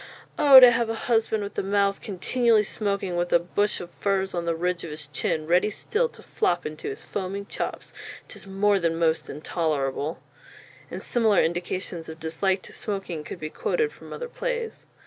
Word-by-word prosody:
Oh, 275 -2 +10
to 250 -1 +9
have 235 -1 +1
a 225 - -1
husband 225 -2 +1
with 200 0 -4
a - - +2
mouth 200 0 +1
continually 220 +3 +2
smoking, 200 -3 -2
with 175 0 -1
a - - +7
bush 195 +4 0
of 175 0 -8
furs 195 -1 0
on 175 -1 -2
the 170 -1 0
ridge 180 +1 -1
of 165 - -6
his 150 0 -7
chin, 155 +1 -2
readie 180 +5 +3
still 465 - -1
to - - -16
flop 410 -3 0
into 155 0 -5
his 135 - -7
foaming 200 +1 -4
chops, - - -5 0.3
'tis - - -10
more 200 +1 +2
than 165 -2 0
most 165 -1 +1
intolerable;" 150 -1 -2 0.7
and - - -6
similar 220 -5 +3
indications 175 0 -3
of 160 0 -9
dislike 185 +4 0
to - - -11
smoking 195 -7 -4
could 170 - -8
be 155 -1 -5
quoted 455 -2 0
from - - -13
other 485 - -5
plays. 475 -2 -4
190 Hz, 185 wpm, -25 LUFS, 165-215 Hz, 0.7 s, Oh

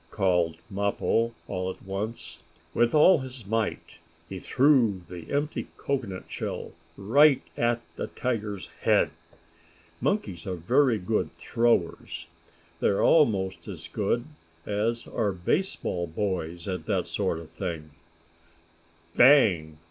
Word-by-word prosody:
called 90 -5 +1
Mappo, 100 +3 0 0.2
all 90 0 -2
at 95 - -8
once. 100 +4 -5 0.3
With 120 +4 +2
all 160 +3 +7
his 130 -4 -7
might 110 +1 -2 0.3
he 95 +1 -6
threw 125 -7 +3
the 85 -3 -9
empty 145 +2 -1
cocoanut 120 -10 -3
shell - - -5 0.3
right 135 +8 +5
at 120 0 +1 0.2
the - - -3
tiger's 105 -6 -3
head. - - +3 0.9
Monkeys 100 - -1
are 95 - -2
very 120 - +3
good 90 -3 -1
throwers. 95 -7 0 0.5
They - - +2
are 100 - +2
almost 105 -13 +3
as 85 -5 -7
good 110 +6 -1 0.4
as 110 +3 -1
are 110 -4 -1
baseball 90 - -1
boys 85 -1 -3
at 95 -1 -4
that - - +1
sort - - -1
of 80 -1 -10
thing. 80 -5 -5 1.2
"Bang!" 95 - +5
100 Hz, 120 wpm, -27 LUFS, 90-120 Hz, 1.2 s, all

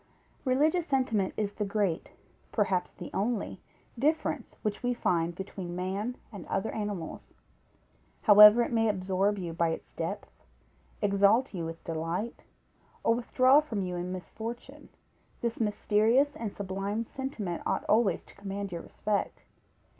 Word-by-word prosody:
_ - - -34 0.4
Religious 310 +7 +2
sentiment 240 -8 +1
is 205 -1 -1
the 210 - -2
great, 200 -4 -1 0.4
perhaps 190 -4 +1
the - - -10
only 220 +1 -2 0.4
difference 305 +5 0
which 210 -2 -2
we 245 0 0
find 170 -6 0
between 185 -2 -6
man 195 +7 -3
and 200 -5 -9
other 195 +3 -1
animals. 205 -6 -5 0.9
However 210 +2 +9
it - - -4
may 225 -1 +2
absorb 195 +1 +1
you 175 -3 -4
by 170 0 +1
its 160 - -5
depth, - - -6 0.6
exalt 205 +5 +4
you 170 -3 -3
with 165 0 -7
delight, 165 +7 -3 0.6
or 230 - +4
withdraw 255 +3 +4
from 225 -10 -2
you 180 -1 -3
in 175 +1 -3
misfortune, 220 +6 -7 0.5
this 235 -1 -2
mysterious 225 +6 +2
and 225 -3 -4
sublime 200 +3 -3
sentiment 220 -10 -4
ought - - -1
always 210 -5 +3
to - - -18
command 200 0 -5
your 170 -1 -4
respect. 205 -1 -2
205 Hz, 140 wpm, -29 LUFS, 185-230 Hz, 0.9 s, However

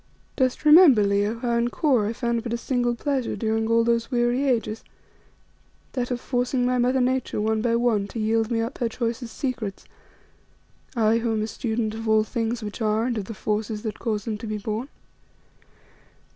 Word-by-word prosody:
"Dost 260 +2 0
remember, 300 - +8
Leo, 205 +2 +1
how 235 0 0
in 235 0 +2
Kôr 250 -8 +2
I - - -2
found 235 -1 -1
but 235 0 -4
a - - 0
single 245 -1 0
pleasure 270 -1 -1
during 220 -1 -1
all 230 0 +4
those 230 0 +1
weary 245 +1 +1
ages 225 -3 -1 1.1
that 250 -2 -2
of 245 -1 -2
forcing 245 0 0
my 250 0 +1
mother 250 +2 +2
Nature 255 -2 0
one 220 +1 0
by 230 0 +1
one 230 -4 +1
to 225 - -6
yield 220 +1 +1
me 230 -2 0
up 230 +4 -4
her 240 -3 0
choicest 230 0 -4
secrets; 240 -7 -4 1.1
I, 225 0 +3
who 230 -1 -1
am 215 -1 0
a - - 0
student 220 -1 -2
of 225 0 -4
all 220 0 +4
things 230 +1 -3
which 210 +3 -6
are 215 +1 +1
and 245 -1 -1
of 210 -3 -3
the 225 - -7
forces 210 +1 -2
that 220 -1 -4
cause 215 -3 -2
them 215 -3 -3
to 225 - -7
be 215 0 -2
born. 215 +5 -4
230 Hz, 195 wpm, -24 LUFS, 220-245 Hz, 1.1 s, remember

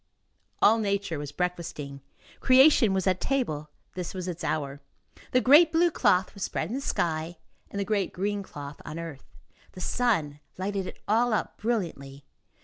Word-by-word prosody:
All 225 +2 +6
nature 200 -6 -1
was 145 -1 -6
breakfasting; 165 -6 -4 0.4
creation 260 -3 +6
was 190 -1 0
at 185 -1 +1
table; 155 - -1 0.2
this 180 0 -5
was 185 -1 -4
its 175 -1 -5
hour; 140 -2 -2 0.5
the 255 - +4
great 305 +6 +7
blue 340 +1 +3
cloth 190 -9 +2
was 200 - -12
spread 160 - -2
in - - -4
the 270 - -2
sky, 165 -7 -2 0.3
and 200 - -5
the 200 - -1
great 200 -3 0
green 200 +2 -2
cloth 145 -6 -9
on 155 - -7
earth; 165 -5 -7 0.5
the - - -10
sun 175 -10 0 0.2
lighted 195 0 -2
it - - -8
all 230 +2 +3
up 215 - -1
brilliantly. 160 -12 -3
185 Hz, 165 wpm, -27 LUFS, 155-220 Hz, 0.5 s, great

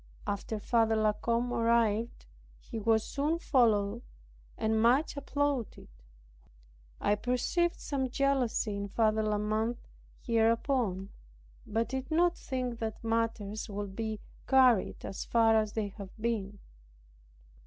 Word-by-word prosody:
After 205 +2 -3
Father 225 +1 +2
La 215 -1 +2
Combe 235 +3 -1
arrived, 230 -1 +1 0.3
he 230 - -7
was 220 0 +2
soon 295 +7 -1
followed 230 -8 +2 0.6
and 220 0 +1
much 255 +8 +3
applauded. 280 - -2 1.1
I - - +2
perceived 250 +10 0
some 265 -3 -2
jealously 255 -5 0
in 200 0 -3
Father 220 +1 +2
La 215 -1 0
Mothe 215 +3 -1 0.4
hereupon, 230 -4 +1 0.6
but 225 +2 0
did 265 +2 -4
not 345 +2 +3
think 250 -3 -4
that 220 -1 -4
matters 225 -2 -2
would 200 -1 -5
be 220 -1 -3 0.3
carried 255 -6 +4
so 195 - -6
far 225 -1 +4
as 215 -1 +1
they 215 -2 -2
have 200 -1 -9
been. 210 -3 -2
225 Hz, 120 wpm, -31 LUFS, 215-250 Hz, 1.1 s, carried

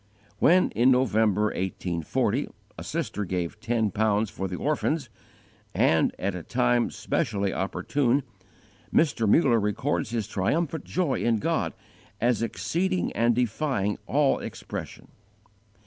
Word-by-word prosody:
When, 180 +3 +4
in 120 +5 +3
November, 110 -5 +3
1840, 90 -3 -1 0.3
a - - -8
sister 105 - -3
gave 90 +1 -3
ten 110 -1 0
pounds 105 +1 +1
for 95 - -4
the 90 - -5
orphans, 150 - -1 0.7
and - - +3
at 100 +1 -2
a 90 - -5
time 120 +4 +1
specially 100 -10 -1
opportune, 130 +7 0 0.7
Mr. 135 -9 +2
Muller 120 -4 +4
records 105 -3 -1
his 115 -3 -2
triumphant 150 - -1
joy 170 -7 0
in 120 -1 +2
God 105 - -1 0.5
as 120 -2 +2
exceeding 175 - -1
and 115 0 +2
defying 120 -3 0
all 140 0 +2
expression. - - -7
115 Hz, 120 wpm, -26 LUFS, 100-135 Hz, 0.7 s, When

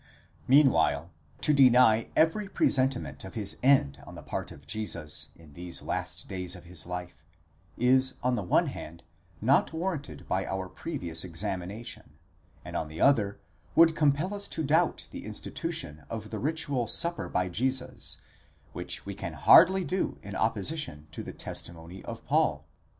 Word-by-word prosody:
Meanwhile, 85 - +4 0.3
to 150 - +4
deny 125 -5 +6
every 195 +6 +2
presentiment 130 -6 +1
of 95 - -9
his 105 -3 -3
end 130 - +3
on - - -10
the - - -10
part - - -4
of 70 0 -13
Jesus 85 -4 -2
in 80 -3 -16
these 85 +2 -6
last - - -4
days 90 -1 -4
of 90 - -11
his 85 -1 -5
life, 90 -2 -6 0.5
is 130 +2 +4
on 125 0 +2
the 120 - 0
one 90 - +3
hand, 85 +2 -7 0.4
not 130 +6 +3
warranted 160 - -4
by - - 0
our 95 -1 -3
previous 90 - -3
examination; 95 - -5 0.5
and - - -7
on 80 - -1
the 80 +1 -9
other, 105 -8 +3 0.4
would 165 -1 +6
compel 150 +5 +2
us 200 0 -3
to 160 - -3
doubt 160 +4 +1
the - - -7
institution 75 +1 -5
of 110 -2 -6
the - - -3
ritual 145 -5 -1
Supper 170 +8 +1
by 90 0 0
Jesus, 130 +7 -2 0.6
which - - -2
we - - -5
can - - -5
hardly 185 +2 +7
do 185 +1 -2
in 100 -1 -7
opposition 110 - -2
to - - -5
the - - -7
testi 85 - -5
mony 85 +3 -11
of - - -7
Paul. - - +1
110 Hz, 160 wpm, -29 LUFS, 90-140 Hz, 0.6 s, hardly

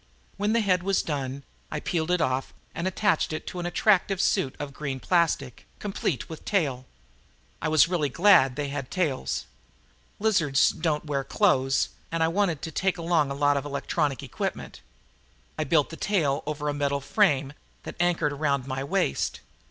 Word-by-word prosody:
When 205 +2 0
the 230 - +3
head 185 -4 +2
was 195 +1 +1
done, 140 -2 -4 0.3
I 150 - -3
peeled 160 +1 -2
it 180 -1 +2
off 130 -3 -1 0.2
and 170 - -2
attached 190 -4 +1
it 155 - -5
to 180 - -6
an 175 - -2
attractive 195 +1 +2
suit 190 -8 +1
of 145 -1 -6
green 140 -3 -4
plastic, 155 -7 0
complete 195 -8 -2
with 160 - -9
tail. 135 -11 -1 0.7
I 160 - 0
was 155 -1 +5
really 165 -5 0
glad 165 -5 +5
they 145 -1 -3
had 140 -2 -5
tails. 155 -8 -1 0.7
The - - -13
lizards 165 -11 +3
didn't 155 -2 -1
wear 140 -2 -1
clothes 135 -8 +2 0.2
and 165 0 +1
I 160 - +3
wanted 175 -4 0
to 160 - -4
take 190 +4 0
along 165 -4 +1
a 140 - -3
lot 145 0 +3
of 140 - -2
electronic 145 -1 -2
equipment. - - -5 0.7
I 155 - -2
built 150 +1 +2
the 165 - -7
tail 155 -9 +1
over 150 -1 -3
a 145 - 0
metal 140 -1 0
frame 140 -3 +2 0.3
that - - -6
anchored 175 -4 +1
around 140 -3 0
my 135 0 -3
waist. 70 - -1
155 Hz, 175 wpm, -26 LUFS, 140-175 Hz, 0.7 s, was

